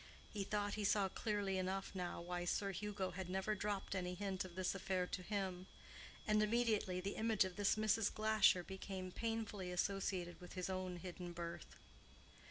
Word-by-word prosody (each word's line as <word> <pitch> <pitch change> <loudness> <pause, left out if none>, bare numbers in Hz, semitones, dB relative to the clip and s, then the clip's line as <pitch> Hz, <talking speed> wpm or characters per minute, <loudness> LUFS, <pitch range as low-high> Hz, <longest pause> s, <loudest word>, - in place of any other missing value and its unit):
He 205 -2 -1
thought 205 0 0
he 215 - -1
saw 200 -1 +4
clearly 200 -2 0
enough 190 +1 -1
now 180 -2 -3
why 175 0 -2
Sir 195 +3 +1
Hugo 195 0 -2
had 180 0 -4
never 190 +3 +1
dropped 205 -1 -1
any 180 -1 -1
hint 195 -1 -1
of 180 -2 -9
this 185 -1 +1
affair 185 -1 0
to 180 - -3
him; 190 -2 -2 0.6
and 215 0 +5
immediately 215 -4 +2
the 195 +2 -3
image 220 -3 +4
of 185 -1 -5
this 205 0 +3
Mrs. 215 0 +3
Glasher 215 -4 +5
became 190 0 -5
painfully 215 -4 -2
associated 180 -1 -1
with 180 - -9
his 185 0 -2
own 185 -1 -2
hidden 175 0 -6
birth. 170 0 -5
190 Hz, 175 wpm, -41 LUFS, 180-210 Hz, 0.6 s, and